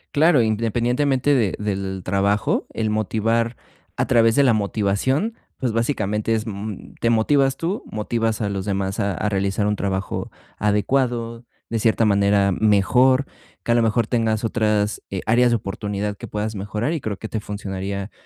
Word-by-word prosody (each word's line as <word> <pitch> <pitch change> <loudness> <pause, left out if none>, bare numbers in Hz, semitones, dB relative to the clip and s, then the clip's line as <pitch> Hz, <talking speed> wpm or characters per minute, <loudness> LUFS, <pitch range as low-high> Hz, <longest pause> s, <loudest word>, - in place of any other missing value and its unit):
Claro, 150 -4 +5
independientemente 120 +5 +1
de 115 -8 +2
del 95 -2 -3
trabajo, 100 +3 +1
el 110 -1 0
motivar 115 +2 0 0.4
a - - +1
través 115 -2 +4
de 140 - +5
la 125 -4 +4
motivación, 110 - 0 0.2
pues, 125 -3 -1
básicamente 110 -2 0
es, 110 - -2
mm, 105 -1 -6
te 115 - +2
motivas 135 +4 +3
tú, 180 +6 -2
motivas 110 +1 -1
a 105 - 0
los 95 -1 -3
demás 95 +1 -2
a 100 -1 0
a 105 - -2
realizar 100 +1 0
un 105 0 +1
trabajo 95 -1 -3 0.3
adecuado, 115 +2 0 0.3
de 115 - 0
cierta 115 +1 +2
manera 100 -1 +3
mejor, 125 +7 +3 0.4
que 120 - -1
a - - +4
lo 120 - +4
mejor 115 +1 +2
tengas 110 -1 0
otras, 105 -2 0
eh, 95 -2 -3
áreas 120 +2 +4
de 120 - +3
oportunidad 105 0 -4
que - - -9
puedas 105 +1 -3
mejorar, 105 +8 -2
y 160 - -3
creo 105 -4 -3
que 110 - -6
te 110 - -3
funcionaría 100 -1 -5
110 Hz, 170 wpm, -22 LUFS, 100-120 Hz, 0.4 s, Claro